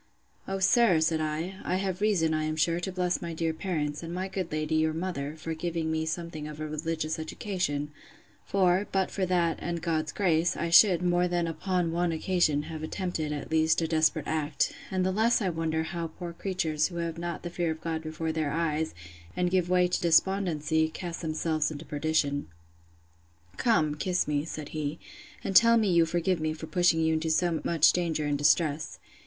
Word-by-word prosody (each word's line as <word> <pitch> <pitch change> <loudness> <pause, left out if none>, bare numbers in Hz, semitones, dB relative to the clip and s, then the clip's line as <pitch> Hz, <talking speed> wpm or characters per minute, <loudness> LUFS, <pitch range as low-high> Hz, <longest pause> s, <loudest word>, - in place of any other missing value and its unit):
O 195 - -2
sir, 190 -2 +4
said 160 0 +1
I, 160 +5 -3
I 180 - -1
have 190 0 -2
reason, 180 -7 +2
I 155 0 0
am 155 0 -2
sure, 165 +2 +1
to 185 +2 -4
bless 180 -1 -1
my 170 -2 -5
dear 165 0 -1
parents, 155 -4 -3
and 165 0 -6
my 185 +2 -3
good 190 -3 -4
lady, 155 0 -2
your 155 0 +2
mother, 160 -4 -3
for 160 +1 -4
giving 160 0 -2
me 160 0 -1
something 160 -2 -4
of 150 0 -8
a 155 - -3
religious 155 +1 -3
education; 160 -4 -3 0.5
for, 190 0 +2
but 190 -1 0
for 190 -2 -1
that, 175 -2 +1
and 170 -1 -3
God's 160 -2 -1
grace, 170 -3 +1
I 170 0 -2
should, 180 0 +7
more 175 0 +2
than 175 -1 0
upon 170 +1 -1
one 175 +1 0
occasion, 160 -3 +1
have 160 0 -7
attempted, 160 -2 -3
at 145 0 -5
least, 160 0 +3
a - - 0
desperate 155 -1 +2
act: 155 -1 -1 0.2
and 185 -1 0
I 190 - +1
the - - -4
less 225 +3 +3
wonder 165 -5 -1
how 170 0 -4
poor 170 +1 -8
creatures, 165 -5 -1
who 175 - -10
have 170 -1 -3
not 170 0 -4
the 175 - -5
fear 175 -1 -1
of 160 0 -3
God 160 -1 -3
before 160 0 -3
their 155 -2 -1
eyes, 160 - -1 0.4
and 180 0 +1
give 180 -2 +1
way 180 0 +4
to 180 - -1
despondency, 160 -3 +2
cast 170 0 -6
themselves 155 -1 0
into 155 +1 -8
perdition. 145 - 0 1.1
Come, 155 -11 +2
kiss 180 +4 -1
me, 145 0 0
said 155 -2 -6
he, 155 0 -3 0.5
and 195 - -3
tell 230 +2 +7
me 215 -4 +2
you 170 -1 +4
forgive 175 +2 0
me 155 0 -1
for 160 0 -7
pushing 175 -1 +2
you 160 0 +2
into 160 +1 -1
so 165 0 +1
much 165 -1 +4
danger 165 -4 -1
and 145 -1 0
distress. 150 0 +2
165 Hz, 200 wpm, -28 LUFS, 155-180 Hz, 1.1 s, should